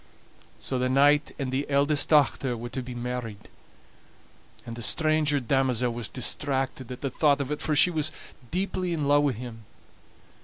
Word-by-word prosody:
So 130 - -3
the 130 0 0
knight 145 +3 +4
and 135 -3 -3
the 135 +3 -2
eldest 145 +1 +2
dochter 140 -4 +3
were 120 +1 -6
to 130 - -4
be 125 0 -8
married, 120 -3 -5 1.2
and 115 -1 -7
the 120 - -8
stranger 155 +2 +2
damosel 125 -1 0
was 115 -2 -4
distracted 135 -1 -2
at 125 - -8
the 135 - -2
thought 145 +1 +2
of 140 0 -3
it, 150 - -3
for 155 - 0
she 180 +5 +5
was 155 -2 0 0.4
deeply 185 -1 -2
in 150 -4 -1
love 145 0 +5
wi' 140 - +1
him. 115 -1 -9
135 Hz, 170 wpm, -26 LUFS, 125-150 Hz, 1.2 s, she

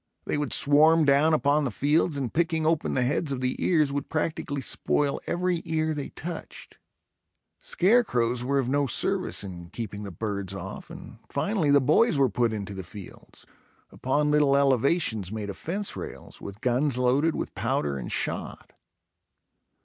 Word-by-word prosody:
They - - -1
would 145 -2 -2
swarm 155 +3 +6
down 140 +3 +4
upon 150 -1 +2
the 135 - -1
fields 145 - +1
and 130 -4 -3
picking 160 -1 0
open 160 -1 0
the 130 - +2
heads 140 +4 -1
of 135 - -2
the 125 0 -1
ears, 155 -5 +2
would 145 0 -3
practically 155 -3 -2
spoil 140 +2 0
every 180 -1 -1
ear 160 -1 -1
they 145 -2 -5
touched. 170 0 -8 0.8
Scare 245 - +3
crows 120 - 0
were 140 +2 0
of 135 -3 0
no 140 +2 +1
service 115 - 0
in 85 -3 -9
keeping 105 -1 -6
the 100 - -6
birds 100 0 -4
off, - - -8
and - - -11
finally 195 -8 0
the 140 0 +6
boys 155 - +3
were 135 -2 +3
put 115 +2 0
into 100 -2 -5
the 95 - -6
fields, 100 +1 -12 0.5
upon 150 +3 0
little 145 -2 +4
elevations 130 - +1
made 105 -2 -4
of - - -11
fence 195 +5 -3
rails, - - -9
with 100 +2 -9
guns 125 +2 +1
loaded 135 +6 +2
with - - -4
powder 70 -2 -1
and - - -6
shot. - - -4
140 Hz, 170 wpm, -26 LUFS, 115-155 Hz, 0.8 s, swarm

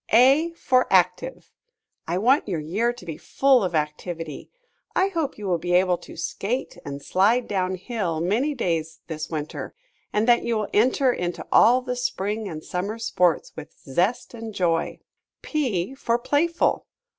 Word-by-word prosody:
A 270 +8 +6
for 255 -6 +2
Active. 185 +8 +1 0.6
I 170 +2 0
want 250 +9 +3
your 175 -5 -1
year 200 +11 0
to 240 -7 -12
be 160 -3 -6
full 270 -4 +3
of 180 -3 -1
activity. 155 +1 -4 0.5
I 380 +2 +3
hope 325 -7 -2
you 210 - -7
will 180 -3 +1
be 175 +2 -2
able 180 -1 +3
to - - -12
skate 245 +7 -3
and 140 0 -7
slide 220 +7 +2
down 185 -2 -1
hill 185 -4 -3
many 230 - 0
days 165 -7 -2
this 155 -1 -5
winter, 155 -2 -5 0.4
and 210 +2 +1
that 240 -1 +5
you 235 -1 0
will 210 -1 -2
enter 255 +3 +3
into 175 -4 -4
all 250 +3 +6
the 250 -1 -3
spring 215 -3 -2
and 155 -2 -7
summer 200 +5 -3
sports 180 -7 +1
with 160 - -10
zest 185 - -1
and 225 -2 -7
joy. 170 -3 0 0.4
P 255 - -1
for 235 -3 0
Playful. 310 +7 +1
205 Hz, 165 wpm, -24 LUFS, 175-245 Hz, 0.6 s, A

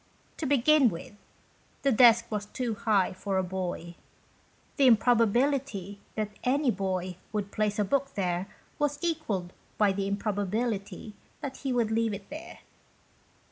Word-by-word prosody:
To 310 - -2
begin 280 0 +5
with, 170 +2 -8 0.7
the 275 - +3
desk 235 -1 +6
was 210 -1 -3
too 240 +1 -3
high 205 -3 +1
for 190 +1 -2
a 190 - +2
boy. 180 -2 -4 0.8
The 275 -3 +5
improbability 230 -2 +2 0.2
that 215 -1 -2
any 270 +1 +2
boy 185 -2 -2
would 205 -2 -3
place 210 -1 0
a 210 - +2
book 275 +6 0
there 180 -1 -1 0.3
was 290 -1 +1
equalled 225 - -2 0.2
by 205 -2 +4
the 195 0 -2
improbability 205 +1 -2 0.3
that 270 -1 -5
he 270 - -3
would 235 -3 +1
leave 225 -1 +1
it 200 +6 -12
there. 315 +3 -9
215 Hz, 140 wpm, -28 LUFS, 195-255 Hz, 0.8 s, desk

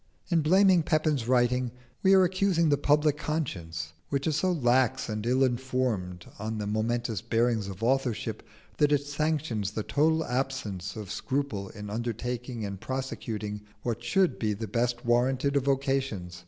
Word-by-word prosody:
In 170 -3 +3
blaming 185 +3 +5
Pepin's 155 -6 +1
writing 125 0 +2 0.3
we 195 0 +6
are 190 - +7
accusing 185 -2 +2
the 145 - +5
public 150 0 +3
conscience, 85 - -3 0.2
which 140 -1 -1
is 155 - +1
so 185 +4 +2
lax 130 -6 +2
and 105 -2 -3
ill 130 +2 +3
informed 120 -8 -1
on 110 +1 -3
the 105 - -3
momentous 110 +1 -1
bearings 115 -2 +1
of 100 +2 -7
authorship 120 -3 0 0.4
that 150 -1 +3
it 145 -1 +2
sanctions 145 -8 -1
the 105 +1 -4
total 160 +5 +2
absence 125 -7 -3
of 105 -3 -6
scruple 125 -5 -2
in 105 0 -8
undertaking 120 +1 -3
and 100 -1 -6
prosecuting 110 -5 -4 0.2
what 120 -1 -2
should 185 +10 +2
be 110 -2 0
the 110 +2 -5
best 120 +3 -1
warranted 130 +4 +2
of 140 -2 +2
vocations. 135 - -1
125 Hz, 155 wpm, -28 LUFS, 110-145 Hz, 0.4 s, are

